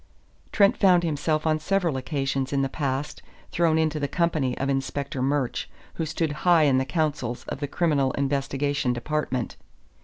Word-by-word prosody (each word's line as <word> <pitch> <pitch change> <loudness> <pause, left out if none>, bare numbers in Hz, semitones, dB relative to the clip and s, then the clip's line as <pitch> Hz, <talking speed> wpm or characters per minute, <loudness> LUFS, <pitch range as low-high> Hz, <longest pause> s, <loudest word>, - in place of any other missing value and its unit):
Trent 200 +2 +5
had - - -22
found 180 -3 +5
himself 155 -1 0
on 155 -1 +2
several 175 -1 0
occasions 135 -1 -2
in 140 -1 +1
the 135 - -1
past 140 0 -3 0.3
thrown 165 -2 +2
into 160 -1 +1
the 145 - -1
company 155 -7 0
of 135 - -1
Inspector 140 +1 -2
Murch, 135 -1 0 0.3
who 160 - -3
stood 160 0 -1
high 175 -3 +5
in 135 -3 +4
the 130 - 0
councils 145 -6 -2
of - - -6
the 145 - -2
Criminal 140 -4 +1
Investigation 140 -1 0
Department. 130 -1 -2
145 Hz, 165 wpm, -25 LUFS, 135-160 Hz, 0.3 s, Trent